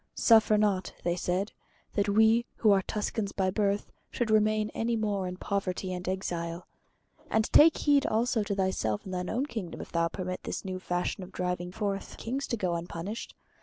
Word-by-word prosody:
"Suffer 220 -2 +5
not," 200 -3 +1
they 175 0 +1
said, 180 +3 -1 0.4
"that 205 -1 +1
we, 220 +3 +4
who 215 - +4
are 195 -1 +5
Tuscans 210 0 -2
by 190 -1 +1
birth, 200 0 0 0.2
should 235 -3 -1
remain 215 0 +3
any 230 +1 -1
more 205 -4 -1
in 180 0 -5
poverty 190 -1 -2
and 180 0 -4
exile. 175 -2 -3 0.6
And 220 0 +2
take 320 +1 +8
heed 285 -2 +3
also 230 +1 +1
to 200 - -1
thyself 190 - -1
and 190 - -6
thine 180 0 -2
own 255 +5 0
kingdom 215 - -6
if - - -8
thou 170 0 +2
permit 185 +1 -4
this - - -5
new 185 -1 -4
fashion 180 +2 -2
of 185 +1 -9
driving 180 -1 -2
forth 200 0 -3
kings 265 +4 -3
to 235 - -1
go 185 -4 0
unpunished. 170 +5 -5
200 Hz, 185 wpm, -29 LUFS, 180-220 Hz, 0.6 s, take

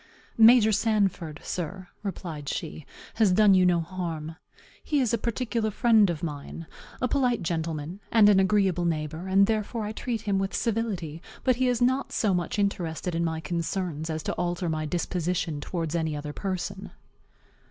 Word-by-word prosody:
"Major 225 -1 +7
Sanford, 195 -8 0
sir," 180 +1 -5
replied 165 -8 -5
she, 160 -4 -5 0.3
"has 220 -4 +4
done 205 +1 +6
you 185 -1 +5
no 175 -1 +3
harm. 165 -2 -5 0.5
He 295 - +1
is 245 -4 +1
a - - +3
particular 235 -1 -1
friend 215 -1 +4
of 170 -2 -3
mine, 150 +1 -5 0.3
a 255 - +1
polite 250 -4 +1
gentleman, 165 +1 -3
and 220 -3 +6
an 205 -2 +6
agreeable 190 -3 +2
neighbor, 160 +1 -2
and 195 +1 +5
therefore 220 +1 -1
I 210 - -3
treat 225 0 -3
him 200 -3 0
with 195 0 -2
civility; 200 -9 -2 0.2
but 255 -2 +2
he 255 0 +2
is 245 -1 +1
not 260 +2 +1
so 205 -4 +1
much 175 +1 -1
interested 180 -4 -1
in 170 +1 0
my 160 -1 -2
concerns 170 -2 -3
as 155 -1 -3
to - - -2
alter 175 0 -2
my 155 -1 -2
disposition 170 -2 -2
towards 165 -1 -3
any 160 -2 -1
other 145 0 -6
person." 195 +1 -4
185 Hz, 170 wpm, -27 LUFS, 165-215 Hz, 0.5 s, Major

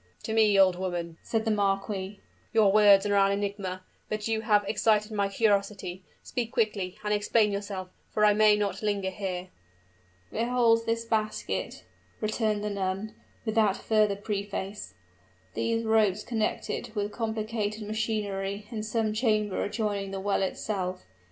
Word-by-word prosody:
"To 220 - -3
me, 215 -2 +4
old 185 -2 +5
woman," 175 -3 -3
said 225 -1 -1
the 220 - +2
marquis, 195 -1 -1 0.3
"your 215 -3 +5
words 205 -1 +6
are 205 - +1
an 195 0 +4
enigma. 200 -2 -3 0.3
But 215 0 -2
you 220 -1 0
have 210 -2 +3
excited 210 0 +2
my 200 -2 0
curiosity: 200 -3 0 0.2
speak 235 -2 -3
quickly, 210 -6 -1
and 210 0 0
explain 210 +1 +2
yourself, 200 -2 -4 0.2
for 210 - +2
I 210 - +6
may 215 0 +5
not 200 -2 -2
linger 200 -3 -1
here." 185 -2 -4 0.8
"Behold 230 -1 +2
this 230 0 0
basket," 215 -1 -2 0.4
returned 215 -1 0
the 210 - -2
nun, 195 +2 -2 0.3
without 215 -3 +2
further 215 -2 +2
preface 200 - -4 0.6
"these 230 0 0
ropes 215 -2 +3
connect 225 -3 -1
it 235 -2 -5
with 205 0 -1
complicated 220 -1 -2
machinery 210 -2 -2
in 220 -2 -3
some 215 0 -1
chamber 215 -3 +1
adjoining 205 -2 -2
the 195 0 -4
well 200 +1 0
itself. 185 -1 -2
210 Hz, 145 wpm, -28 LUFS, 195-220 Hz, 0.8 s, words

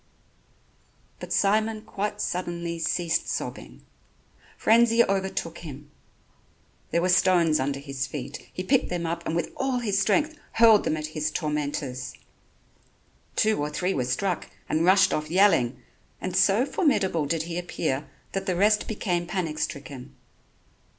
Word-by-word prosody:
But - - -8
Simon 215 +2 +1
quite 210 -1 -3
suddenly 170 -1 -3
ceased 165 +1 0
sobbing. - - -5 0.7
Frenzy 230 +1 +5
overtook 190 -4 -2
him. 145 -2 -10 1.0
There 170 - +1
were 185 - +2
stones 175 -4 +4
under 140 +1 -1
his 135 -1 -4
feet, 140 0 -7
he 185 - -5
picked 255 +6 +2
them 175 -1 -2
up 170 +1 -3
and 160 - -1
with 170 -1 -1
all 265 -1 -1
his 205 -5 0
strength 295 +11 +2 0.2
hurled 225 -2 +6
them 155 - 0
at 155 - -4
his 155 -1 -1
tormentors. 145 -5 -3 1.2
Two 215 -7 +2
or 145 - -1
three 180 +5 -1
were 130 - 0
struck 175 +8 -1 0.2
and 160 +2 +1
rushed 190 +1 +5
off 155 0 -2
yelling, 175 -9 +3 0.4
and 185 - -4
so 210 +6 +4
formidable 195 - +1
did 165 +1 0
he 170 +1 -4
appear 155 -5 -3 0.2
that 195 0 -3
the 185 - +1
rest 210 +3 +3
became 180 -5 -2
panic 170 -4 -3
stricken. 140 -3 -5
175 Hz, 145 wpm, -26 LUFS, 150-200 Hz, 1.2 s, hurled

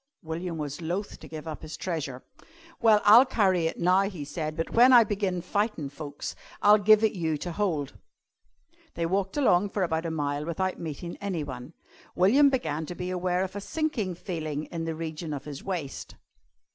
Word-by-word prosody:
William 165 +1 -4
was 145 +1 -5
loth 180 +5 -4
to - - -11
give 155 0 -8
up 155 - -6
his 155 0 -7
treasure. 145 -8 -4 0.6
"Well, 220 -3 +5
I'll 225 +5 +9
carry 190 -10 +2
it - - -4
now," 185 +3 +3
he 165 -8 -7
said, 155 +1 -4
"but 165 - -2
when 245 +3 +6
I 240 -2 +9
begin' 195 -4 -2
fightin' 200 -6 -1
folks, 145 0 -7 0.2
I'll 210 +1 +6
give 215 +1 +5
it 220 - +4
you 160 -4 -1
to 175 +4 -5
hold." 165 -7 -2 1.0
They 170 - -1
walked 195 - -1
along 205 -8 +3
for 195 -1 -1
about 165 -1 -1
a - - -2
mile 145 -2 -2
without 185 +3 -2
meeting 165 +1 -6
anyone. 150 -8 -5 0.4
William 260 +11 +5
began 160 - -2
to 180 - -6
be 180 +1 -4
aware 180 0 0
of 190 +1 -6
a 205 - -4
sinking 230 - -2
feeling 155 -5 -4
in 165 -1 -3
the 165 -1 -3
region 160 0 -5
of 140 -1 -6
his 145 -2 -7
waist. 170 -8 -5
175 Hz, 185 wpm, -27 LUFS, 155-200 Hz, 1.0 s, I'll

